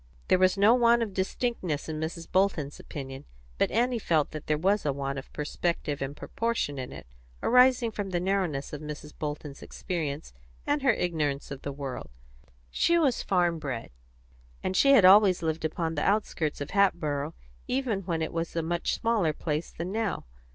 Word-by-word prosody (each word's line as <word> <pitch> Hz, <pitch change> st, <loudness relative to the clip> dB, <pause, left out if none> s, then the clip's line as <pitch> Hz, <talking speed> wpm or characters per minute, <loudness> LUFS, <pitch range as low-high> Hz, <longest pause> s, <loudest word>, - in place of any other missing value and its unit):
There 185 Hz, -, +5 dB
was 185 Hz, +1 st, +4 dB
no 205 Hz, +4 st, +6 dB
want 235 Hz, -1 st, +4 dB
of 210 Hz, -4 st, -5 dB
distinctness 190 Hz, -, -2 dB
in 155 Hz, -1 st, -4 dB
Mrs. 165 Hz, +1 st, -4 dB
Bolton's 180 Hz, -7 st, +1 dB
opinion, 135 Hz, -2 st, -8 dB, 0.3 s
but -, -, +3 dB
Annie 240 Hz, +1 st, +1 dB
felt 160 Hz, -7 st, +1 dB
that 155 Hz, -1 st, -7 dB
there 150 Hz, -, +2 dB
was 195 Hz, +6 st, +2 dB
a 145 Hz, -, +1 dB
want 140 Hz, 0 st, -3 dB
of 135 Hz, -, -12 dB
perspective 150 Hz, -1 st, -2 dB
and 140 Hz, +2 st, -4 dB
proportion 230 Hz, -12 st, -2 dB
in 125 Hz, -, -5 dB
it, -, -, -9 dB, 0.4 s
arising 250 Hz, -1 st, +5 dB
from 205 Hz, -2 st, -4 dB
the 175 Hz, -2 st, 0 dB
narrowness 180 Hz, -7 st, -1 dB
of 150 Hz, -, -5 dB
Mrs. 150 Hz, 0 st, -7 dB
Bolton's 150 Hz, -1 st, -5 dB
experience 155 Hz, -, -4 dB, 0.3 s
and 290 Hz, 0 st, +1 dB
her 270 Hz, -2 st, +5 dB
ignorance 150 Hz, -8 st, -1 dB
of 140 Hz, -1 st, -6 dB
the 140 Hz, -, -4 dB
world; 140 Hz, -2 st, -6 dB, 0.6 s
she 340 Hz, -, +3 dB
was 280 Hz, -7 st, +2 dB
farm 175 Hz, -3 st, +1 dB
bred, 130 Hz, -, -5 dB, 0.7 s
and 185 Hz, -, -1 dB
she 275 Hz, +8 st, +6 dB
had 225 Hz, -9 st, +7 dB
always 190 Hz, -2 st, +7 dB
lived 160 Hz, 0 st, -1 dB
upon 160 Hz, +1 st, -1 dB
the 145 Hz, -, -1 dB
outskirts 190 Hz, -8 st, 0 dB
of 145 Hz, -, -5 dB
Hatboro', 155 Hz, -7 st, +1 dB, 0.3 s
even 250 Hz, -6 st, 0 dB
when 170 Hz, -3 st, -2 dB
it 160 Hz, -, -4 dB
was 165 Hz, 0 st, -3 dB
a 165 Hz, -, 0 dB
much 170 Hz, +1 st, -1 dB
smaller 215 Hz, -9 st, +1 dB
place 155 Hz, +1 st, -3 dB
than 175 Hz, +3 st, -5 dB
now. 220 Hz, -2 st, -2 dB
170 Hz, 180 wpm, -28 LUFS, 150-205 Hz, 0.7 s, had